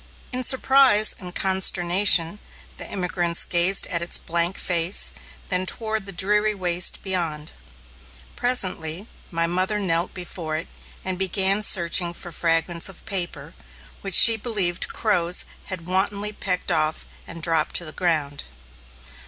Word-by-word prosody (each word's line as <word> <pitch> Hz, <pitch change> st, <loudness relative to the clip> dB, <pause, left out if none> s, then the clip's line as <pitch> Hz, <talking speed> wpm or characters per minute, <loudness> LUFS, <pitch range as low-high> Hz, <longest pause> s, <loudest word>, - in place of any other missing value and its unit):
In 255 Hz, 0 st, -4 dB
surprise 265 Hz, -4 st, +4 dB
and 180 Hz, -2 st, -10 dB
consternation, 190 Hz, -1 st, +2 dB, 0.4 s
the -, -, -8 dB
emigrants 175 Hz, -2 st, 0 dB
gazed 180 Hz, +2 st, +2 dB
at 170 Hz, -3 st, -2 dB
its 170 Hz, -, -1 dB
blank 170 Hz, +2 st, -3 dB
face, 170 Hz, -, 0 dB, 0.4 s
then 185 Hz, +1 st, -1 dB
toward 220 Hz, -2 st, -2 dB
the -, -, -6 dB
dreary 210 Hz, +3 st, 0 dB
waste 180 Hz, -2 st, +2 dB
beyond. 165 Hz, -5 st, -2 dB, 0.8 s
Presently, 185 Hz, -7 st, 0 dB, 0.2 s
my 165 Hz, -1 st, -1 dB
mother 185 Hz, +5 st, -1 dB
knelt 175 Hz, -3 st, -1 dB
before 170 Hz, -3 st, -5 dB
it 160 Hz, -, -7 dB, 0.4 s
and 185 Hz, -1 st, -3 dB
began 195 Hz, +2 st, +2 dB
searching 175 Hz, -3 st, +3 dB
for 175 Hz, -, -9 dB
fragments 165 Hz, +2 st, -1 dB
of 190 Hz, -, -12 dB
paper, 175 Hz, -7 st, -3 dB, 0.5 s
which 195 Hz, -2 st, -1 dB
she 230 Hz, -1 st, +9 dB
believed 200 Hz, -6 st, -1 dB
crows 180 Hz, -5 st, -1 dB, 0.2 s
had 185 Hz, -4 st, -5 dB
wantonly 200 Hz, +3 st, 0 dB
pecked 185 Hz, -3 st, -2 dB
off 155 Hz, 0 st, -1 dB, 0.2 s
and 165 Hz, -1 st, -10 dB
dropped 165 Hz, -2 st, 0 dB
to 170 Hz, -, +4 dB
the 155 Hz, -, -5 dB
ground. 155 Hz, -5 st, -2 dB
180 Hz, 135 wpm, -22 LUFS, 170-195 Hz, 0.8 s, she